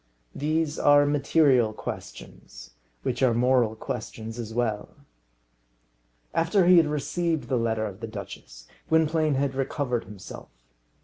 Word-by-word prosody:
These 155 +1 -1
are 145 0 +5
material 140 -5 +3
questions, - - -9 0.3
which 125 0 -2
are 125 -3 +3
moral 120 -2 +2
questions 110 0 -6
as 115 -2 -5
well. 110 -3 -2 1.4
After 170 +3 +2
he 180 0 +7
had 165 -2 +5
received 160 +2 -2
the 130 - +1
letter 115 -1 0
of 100 -2 -7
the 115 - -5
duchess, 100 - -10 0.2
Gwynplaine 160 -2 +2
had 135 0 0
recovered 130 -2 -2
himself. 100 0 -11
130 Hz, 125 wpm, -26 LUFS, 110-150 Hz, 1.4 s, he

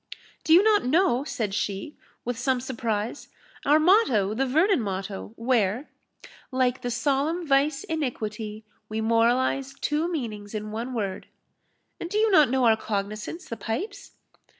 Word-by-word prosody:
"Do - - -1
you 350 +4 +8
not 430 -1 +4
know," 275 -2 +2
said 220 -9 -3
she, 200 +7 -3 0.3
with 245 0 -2
some 255 +1 0
surprise, 235 -2 -3 0.4
"our 295 +2 +6
motto 305 - +4
the 265 +4 0
Vernon 320 - +3
motto, 195 0 -5
where, 230 +1 0 0.6
Like 255 -1 +1
the 245 - -3
solemn 285 +7 0
vice 280 0 +2
iniquity, 220 -8 -4 0.2
We 215 +1 -3
moralise 240 +4 +1
two 305 +5 -1
meanings 215 - -5
in 215 0 -4
one 235 +4 -4
word 200 -4 -3 0.7
And 340 - -5
do 415 - -1
you 435 0 +3
not 305 -8 +6
know 260 0 +2
our 225 -1 +6
cognisance, 215 - -4
the 230 - -5
pipes?" 390 - -5
250 Hz, 150 wpm, -26 LUFS, 215-300 Hz, 0.7 s, you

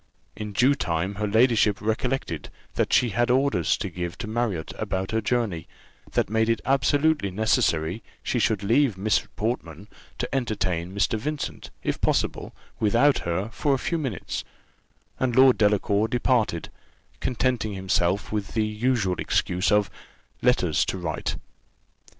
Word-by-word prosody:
In 105 -1 -5
due 125 +7 +4
time 90 -7 -1
her 105 - +1
ladyship 110 -2 +3
recollected 110 - -2 0.2
that - - 0
she 125 - +4
had 120 +4 +1
orders 130 - +2
to - - -3
give 85 0 -5
to - - -5
Marriott 110 -7 -2
about 95 0 -2
her 110 0 +1
journey, 110 -10 -1 0.5
that - - +2
made 110 +1 +1
it 115 - +2
absolutely 140 -1 +2
necessary 90 -2 +1 0.2
she 125 - 0
should 110 -2 +1
leave 115 0 +3
Miss 105 +3 +1
Portman 105 - -3 0.3
to - - -2
entertain 95 -9 -1
Mr. 100 +2 0
Vincent, 150 +5 -4
if - - -2
possible, - - 0 0.3
without 120 +7 +3
her, 90 +5 -2
for 140 +2 +1
a - - -1
few 165 +5 -2
minutes; 130 -10 -4 0.8
and 125 -2 0
Lord 130 0 +7
Delacour 105 0 +2
departed, 115 -8 0 0.5
contenting 125 -3 0
himself 95 0 0
with 105 -2 -3
the 110 -1 +2
usual 105 -4 0
excuse 90 +4 0
of 105 -1 +3 0.5
letters 105 -10 +3
to - - -3
write. 80 -4 -3
110 Hz, 145 wpm, -25 LUFS, 95-125 Hz, 0.8 s, Lord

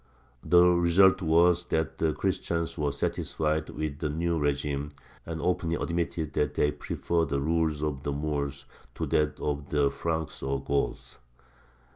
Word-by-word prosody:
The 90 0 +6
result 90 +2 +5
was 85 +1 +4
that 80 -3 -1
the 80 -1 +2
Christians 85 -2 -2
were 75 -3 0
satisfied 75 +2 -1
with 75 -2 -4
the 75 - -1
new 85 +2 -1
régime, 70 0 -1 0.3
and 80 -1 -4
openly 85 0 0
admitted 85 -3 -2
that 75 - 0
they 75 - +2
preferred 85 0 -1
the 70 0 0
rule 80 0 0
of 70 -3 -4
the 70 - -2
Moors 70 -1 -3 0.3
to - - -2
that 75 -1 0
of 75 -1 -3
the 70 -2 +2
Franks 80 -2 -3
or 70 0 -1
Goths. 70 0 -2
80 Hz, 150 wpm, -28 LUFS, 75-85 Hz, 0.3 s, The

